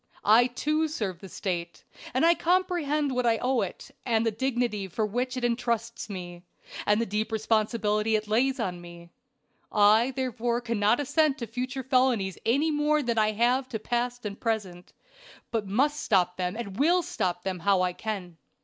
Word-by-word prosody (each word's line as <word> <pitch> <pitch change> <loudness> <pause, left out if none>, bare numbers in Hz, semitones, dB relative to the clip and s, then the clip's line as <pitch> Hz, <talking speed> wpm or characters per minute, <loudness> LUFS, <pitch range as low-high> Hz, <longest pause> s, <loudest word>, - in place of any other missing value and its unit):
I, 225 +4 +6
too, 305 +5 0
serve 205 - -4
the 195 - -10
State, 170 -2 -4 0.3
and 260 +6 +2
I 340 - +6
comprehend 335 -5 +1
what 250 -1 +1
I 225 -1 +3
owe 255 +1 +1
it, - - -6
and 230 -2 +1
the 225 - +2
dignity 235 -3 -1
with 180 - -21
which 250 +3 -2
it 250 - -4
intrusts 235 -1 -1
me, 175 -3 -7 0.5
and 210 +1 +4
the 230 - +1
deep 215 +2 -2
responsibility 215 0 +1
it 215 0 -1
lays 255 +5 +1
on 180 -6 -3
me. 170 0 -12 0.6
I 215 +4 +5
therefore 240 -2 -1
cannot 230 -1 +1
assent 295 0 +2
to 235 - -4
future 250 +4 -4
felonies 250 -7 +1
any 285 +7 +2
more 300 0 +2
than 235 -2 0
I 215 0 +2
have 250 +4 +1
to 225 - -3
past 240 +2 -2
and 200 -1 -5
present, 200 -6 -3 0.6
but 220 -4 -1
must 280 +9 +1
stop 180 -7 +2
them, 180 +1 -2
and 205 -4 -6
will 345 +5 +4
stop 180 - -2
them 185 -2 -3
how 190 +1 +2
I 180 0 0
can. 185 -5 -5
230 Hz, 175 wpm, -27 LUFS, 205-260 Hz, 0.6 s, I